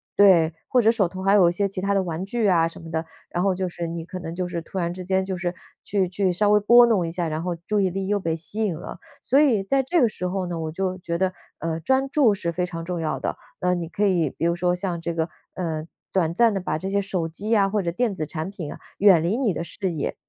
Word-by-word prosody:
对， 175 -5 +6
或 250 - +3
者 225 -1 +5
手 215 -5 +1
头 185 +2 -7
还 195 +1 +4
有 190 -4 +6
一 - - 0
些 200 +3 0
其 190 -1 -4
它 200 +1 +1
的 195 - +2
玩 170 0 -4
具 220 +2 0
啊 170 -3 +4
什 165 - -10
么 165 -1 -10
的， 160 0 -2 0.2
然 175 - -1
后 195 -2 +2
就 185 0 -2
是 175 -1 -5
你 165 0 -5
可 185 +1 -7
能 165 -1 -6
就 180 0 -2
是 170 -1 -4
突 165 - -9
然 170 -1 -1
之 185 0 -7
间 190 +1 0
就 190 -1 -3
是 180 0 -3 0.3
去 195 -2 0
去 185 +1 0
稍 205 +4 +2
微 210 - +6
拨 240 +4 +7
弄 215 -7 +2
一 - - -4
下， 175 0 -2
然 155 0 -3
后 180 -1 -2
注 210 -1 +1
意 190 - +2
力 190 +2 -3
又 205 0 +1
被 165 -4 -1
吸 170 +7 -1
引 195 -6 0
了。 155 - -8 0.2
所 275 +4 +4
以 240 -10 +3
在 270 +8 +2
这 300 +7 +1
个 245 - +5
时 180 -4 -4
候 185 0 -2
呢， 175 -2 -4
我 160 -1 -3
就 185 +2 -2
觉 170 -1 -3
得， 185 +1 0 0.2
呃， 165 0 -3
专 265 - +1
注 265 -8 +4
是 170 -3 -2
非 180 +1 -1
常 165 -2 -6
重 175 -1 -3
要 155 - -2
的。 - - -2 0.2
那 180 0 +1
你 170 -2 -3
可 205 +4 0
以 175 -6 +2
比 165 - -4
如 170 0 +2
说 175 0 +1
像 180 -2 -3
这 170 0 -3
个， 160 -1 0 0.3
嗯， 160 -3 -3 0.3
短 170 -4 +2
暂 230 +1 +4
地 195 - -2
把 180 - -2
这 190 - -5
些 200 +1 +1
手 185 -4 -2
机 185 +6 -6
呀 205 -3 +4
或 205 +1 0
者 170 -2 -2
电 225 +4 0
子 155 -4 -3
产 160 +4 -4
品 170 -7 -6
啊 - - -9 0.2
远 190 -5 +6
离 175 +6 +1
你 250 -6 +1
的 170 - -3
视 185 +2 -3
野。 155 -4 -3
185 Hz, 310 characters per minute, -24 LUFS, 170-200 Hz, 0.3 s, 拨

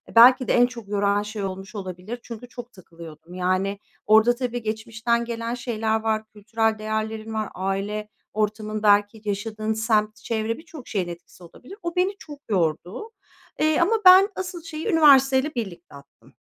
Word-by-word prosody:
belki 255 +2 +8
de - - +2
en 245 0 +6
çok 235 -4 -8
yoran 205 0 +1
şey 210 -1 -5
olmuş 195 +2 -6
olabilir. 190 +4 -6
Çünkü 235 +1 -9
çok 245 0 -10
takılıyordum. 165 -2 -13
Yani, 185 +2 -1 0.3
orada 220 +3 +5
tabii 245 -1 -3
geçmişten 225 +2 -1
gelen 230 0 -4
şeyler 225 -2 -1
var, 220 -1 -1
kültürel 220 +1 -1
değerlerin 220 +1 -3
var, 215 -1 -2
aile 200 +3 -3 0.2
ortamın, 215 0 -2
belki, 205 +1 +3
yaşadığın 215 +2 -2
semt, 215 -1 +1
çevre... 225 0 -3
Birçok 315 -5 -12
şeyin 185 -4 -2
etkisi 175 +1 -11
olabilir. 250 - -13
O 340 0 -4
beni 375 +2 +1
çok 295 -2 -11
yordu, 180 - -1 0.5
eee, 310 0 +2
ama 395 +7 +3
ben 375 +3 +9
asıl 360 -2 -5
şeyi 320 +3 -6
üniversiteyle 280 -4 +5
birlikte 175 - -6
attım. 140 0 -18
220 Hz, 155 wpm, -24 LUFS, 205-245 Hz, 0.5 s, ben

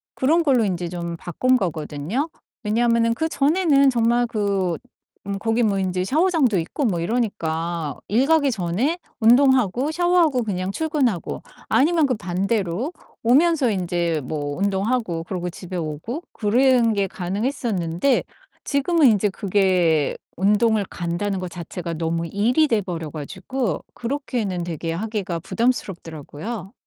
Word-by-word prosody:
그런 320 +6 +3
걸로 260 -7 +3
인제 175 -3 -2
좀 170 -1 -4
바꾼 255 +11 +1
거거든요. 170 - -2 0.3
왜냐면은 230 +1 +2
그전에는 300 -1 +3
정말 240 0 +2
그 200 -5 0 0.5
음 200 - -2
거기 225 +2 +1
뭐 200 -3 +1
인제 185 -1 -1
샤워장도 300 - +2
있고 170 - -3
뭐 180 -6 0
이러니까 170 -7 -2
일 235 +7 +3
가기 315 -4 +3
전에 220 - -1 0.2
운동하고 255 +1 +4
샤워하고 345 -6 +2
그냥 190 -3 -2
출근하고 280 - -1 0.3
아니면 315 +2 +3
그 255 - +1
반대로 195 - -1 0.3
오면서 280 +1 +4
인제 175 -4 -1
뭐 145 0 -3
운동하고 195 -2 0
그러고 180 -1 -3
집에 180 +1 -7
오고 165 - -4
그런 240 +2 +3
게 200 -2 0
가능했었는데 195 - -1 0.4
지금은 300 +2 +3
인제 210 -3 +3
그게 185 -7 +1 0.2
운동을 210 +3 +3
간다는 180 +3 -2
거 185 - -4
자체가 170 0 -6
너무 165 +1 -1
일이 240 - +2
돼 225 -6 +2
버려 170 -5 -5
가지고 185 - -3
그렇게는 235 -8 -3
되게 165 -1 -4
하기가 195 -2 -3
부담스럽더라고요. 195 - -3
205 Hz, 305 characters per minute, -22 LUFS, 175-255 Hz, 0.5 s, 운동하고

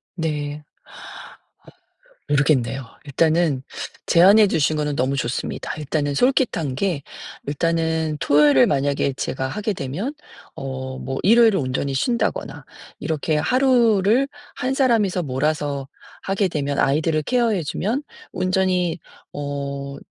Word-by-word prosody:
네. 150 -3 -3 1.7
모르겠네요. 135 -3 +1 0.2
일단은 155 -1 +1 0.4
제안해 200 +5 +6
주신 155 -3 +1
거는 150 -1 -1
너무 135 +2 0
좋습니다. 125 -1 -3
일단은 145 -1 -2
솔깃한 205 - +1
게 170 -5 -1 0.4
일단은 160 +1 0
토요일을 145 -2 +5
만약에 140 0 0
제가 130 0 -3
하게 210 +9 -2
되면 180 - -4 0.4
어 130 -1 -5
뭐 135 - -4
일요일을 225 0 +5
온전히 135 0 -2
쉰다거나 235 - -1 0.4
이렇게 155 0 -1
하루를 245 - +3 0.3
1 260 +1 -2
사람이서 220 -9 +2
몰아서 140 0 -2 0.3
하게 195 0 0
되면 145 -3 -2
아이들을 155 +2 +1
케어해 230 - +1
주면 225 - -2 0.3
온전히 185 -2 0 0.3
어 140 -1 -5
155 Hz, 265 characters per minute, -22 LUFS, 140-195 Hz, 1.7 s, 제안해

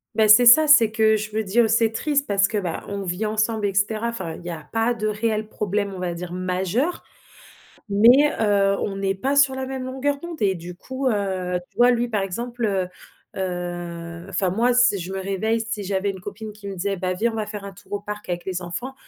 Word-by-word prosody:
Bah, 215 -1 +3
c'est 245 +3 +8
ça, 310 +6 +8
c'est 235 -7 +6
que 220 -1 +3
je 215 +1 -5
veux 220 +1 -1
dire, 220 +3 +2
c'est 225 0 +3
triste 285 +4 0
parce 200 -3 +2
que, 210 - -3
bah, 180 -4 -3
on 200 0 -4
vit 180 +4 -2
ensemble 215 0 0
et 195 - 0
cetera. 215 +3 0
Enfin 190 -8 -4
il - - -12
y - - -4
a 160 -3 -6
pas 225 +2 +1
de 215 -2 -2
réel 215 0 -1
problème, 205 -1 -2
on 185 - -7
va 175 -1 -2
dire 175 +1 -7
majeur, 185 - -1 0.9
mais, 240 +9 +6
heu, 200 -2 +2
on 195 - -3
n'est 195 0 -1
pas 270 +8 -1
sur 275 -1 +4
la 265 0 -3
même 265 -1 -5
longueur 275 +2 -2
d'onde 340 +1 -8
et 195 -3 +2
du 175 0 -8
coup, 260 +7 -4
heu. 190 -4 -1
Tu - - -30
vois, 245 +1 +6
lui, 240 0 +1
par 210 -3 0
exemple, 235 +5 -4
heu 190 -3 0 0.5
heu, 175 -2 -5
enfin 190 -2 0
moi 240 +5 +2
si 245 -5 +4
je 180 +2 -6
me - - -3
réveille, 200 +4 -1
si 220 -2 -4
j'avais 195 +1 -1
une 190 - -10
copine 210 +3 -8
qui 210 -1 -11
me 195 - -5
disait: 195 +2 -2
«Bah, 185 0 -1
viens 230 +5 0
on - - -7
va 215 - -1
faire 210 -1 -7
un 200 - -7
tour 190 +2 -13
au 205 - -1
parc 210 0 -7
avec 175 0 -3
les 185 -1 -3
enfants», 180 +10 -5
210 Hz, 240 wpm, -23 LUFS, 190-230 Hz, 0.9 s, c'est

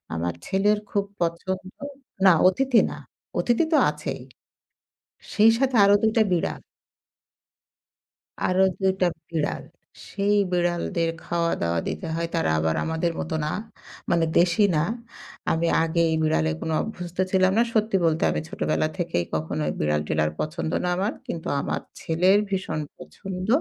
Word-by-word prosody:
আমার 85 +1 -2
ছেলের 205 +2 +2
খুব 200 -1 0 0.2
পছন্দ 185 +3 -3 0.5
না 190 - +9 0.2
অতিথি 250 +5 +3
না, - - -7 0.4
অতিথি 240 +7 +2
তো - - +6
আছেই। - - -6 1.1
সেই 215 +2 +6
সাথে 265 -1 +1
আরও 200 - +6
২ 220 0 +3
টা 225 - +6
বিড়াল। 175 - -1 1.9
আরো 185 +1 +2 0.2
২ 190 -1 +3
টা 180 - +5 0.2
বিড়াল, 160 -3 -2 0.4
সেই 200 +1 0 0.2
বিড়ালদের 175 -1 0
খাওয়া 170 -1 0
দাওয়া 85 0 0
দিতে 180 - -4
হয় 170 0 -1
তারা 165 - +1
আবার 80 0 0
আমাদের 160 +1 -1
মতো 160 0 -3
না 150 - -1 0.6
মানে 170 -1 +3
দেশি 175 +3 +3
না। 150 - +2 0.7
আমি 165 +1 +1 0.2
আগে 165 +1 -1
এই 160 - +2
বিড়ালে 80 - +1
কোন - - -3
অভ্যস্ত 180 -5 -7
ছিলাম 190 0 +4
না। 230 - +5
সত্যি 215 -2 +1
বলতে 160 0 +1
আমি - - -2
ছোটবেলা 155 - 0
থেকেই 165 - -1
কখনো 80 -1 -2 0.2
বিড়াল 75 0 +1
টিরাল 75 0 +1
পছন্দ 160 +1 -3
না 180 - 0
আমার, 200 +4 0
কিন্তু 165 - -5
আমার - - -2 0.2
ছেলের 180 +5 +3
ভীষণ 185 -5 -2 0.2
পছন্দ 185 0 -7
175 Hz, 145 wpm, -24 LUFS, 160-195 Hz, 1.9 s, না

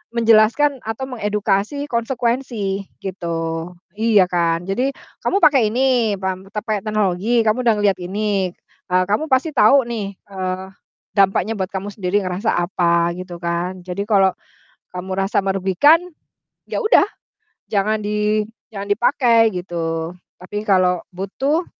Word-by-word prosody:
menjelaskan 230 +5 +4
atau 225 +4 -3
mengedukasi 210 +5 -1
konsekuensi, 235 -4 -1 0.2
gitu. 165 -2 -3 0.3
Iya 215 -4 +4
kan, 170 -1 +1
jadi 255 +7 0 0.3
"Kamu 395 - +1
pake 260 -8 +5
ini, 245 -4 +2
pam 190 0 -4
tape 210 -1 -2
teknologi, 215 +2 +1
kamu 220 +4 +1
udah 230 - +5
ngelihat 195 -3 +2
ini, 195 -1 -1 0.4
eee, 185 0 +4
kamu 310 +10 +1
pasti 270 +5 +2
tahu 250 +4 +5
nih, 205 -5 -4
eee, 185 -1 -4 0.5
dampaknya 195 +1 +2
buat 190 -1 -2
kamu 195 +1 -4
sendiri, 200 0 0
ngerasa 185 +5 -1
apa," 170 -1 +1
gitu 180 -1 -7
kan. 175 +2 -2
"Jadi 180 +2 -4
kalau, 195 -3 +4 0.6
kamu 185 +1 -5
rasa 195 +3 +1
merugikan, 195 - +4 0.7
ya - - -3
udah 435 -3 +5 0.7
jangan 215 +1 +1
di 210 0 +1 0.3
jangan 200 -1 -6
dipakai," 230 -1 +4
gitu. 165 -2 -3 0.3
"Tapi 205 +3 -5
kalau 180 -2 +3
butuh" 270 - -1
200 Hz, 130 wpm, -20 LUFS, 185-230 Hz, 0.7 s, pake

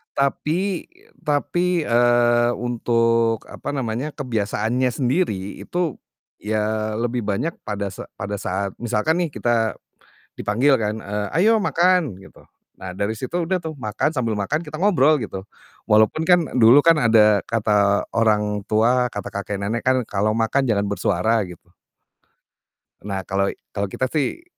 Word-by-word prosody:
Tapi 160 +7 -1 0.4
tapi, 175 +4 +1
eee 120 -1 +3
untuk, 115 -1 +1
apa - - -6
namanya, 125 +2 -2
kebiasaannya 115 -1 -1
sendiri, 120 - -1
itu 175 -5 -3 0.4
ya 110 0 -1
lebih 120 +2 -1
banyak 120 - -1
pada 100 -2 -3
sa - - -9
pada 100 +1 -5
saat 95 +2 -2
misalkan 120 +8 0
nih, 175 - 0
kita 115 -4 0 0.6
dipanggil 130 +7 +2
kan, 110 0 -2
eee, 105 0 -3
"Ayo 225 +4 +5
makan!" 175 - +1
gitu. 95 - -17 0.4
Nah 90 -1 -7
dari 100 +2 -1
situ 130 +9 -5
udah 180 +1 -1
tuh 160 -3 -6
makan, 110 +3 -1
sambil 115 -3 0
makan 105 +11 -2
kita 155 0 -8
ngobrol 155 -7 +4
gitu. 95 -4 -6 0.4
Walaupun 110 +9 +3
kan 180 +1 +5 0.2
dulu 120 +3 +7
kan 165 +2 +5
ada 110 -5 +4
kata 105 -3 +1
orang 105 -2 +1
tua, 120 +4 +2
kata 105 - -5
kakek 100 0 -5
nenek 110 +4 -2
kan 130 0 +3
kalau 105 +2 0
makan 115 +5 +1
jangan 100 -4 +1
bersuara 100 +2 +1
gitu. 85 0 -14 1.3
Nah 95 -1 -5
kalau 100 +1 0
i - - -13 0.4
kita 130 - -1
sih 155 - -1
115 Hz, 140 wpm, -22 LUFS, 105-140 Hz, 1.3 s, dulu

